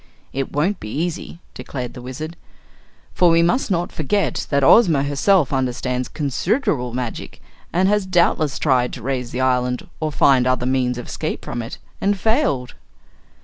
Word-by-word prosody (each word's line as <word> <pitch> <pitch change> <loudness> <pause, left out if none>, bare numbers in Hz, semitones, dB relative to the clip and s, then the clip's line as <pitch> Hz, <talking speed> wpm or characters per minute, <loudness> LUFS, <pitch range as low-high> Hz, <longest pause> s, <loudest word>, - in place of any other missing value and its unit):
"It 135 0 -3
won't 175 +8 0
be 110 - -7
easy," 170 +5 -4
declared 125 -3 -6
the 125 - -9
Wizard, 140 +7 -6 0.8
"for 180 - +4
we 165 0 +4
must 230 +10 +1
not 175 -2 0
forget 200 +7 -1
that 140 -1 +2
Ozma 160 - +6
herself 145 +2 +2
understands 125 -1 -1
considerable 145 - -1
magic, 120 -1 -5 0.3
and 185 +2 +2
has 205 -1 +1
doubtless 170 -5 +2
tried 125 -4 +1
to 125 - -8
raise 125 -2 -2
the 125 - -3
island 125 -1 0
or 155 -1 -1
find 130 -3 +4
other 130 -1 +1
means 125 -1 +1
of 125 - -6
escape - - -4
from 120 - -4
it 115 - -7 0.3
and 200 0 +2
failed." 220 - +1
140 Hz, 160 wpm, -21 LUFS, 125-175 Hz, 0.8 s, Ozma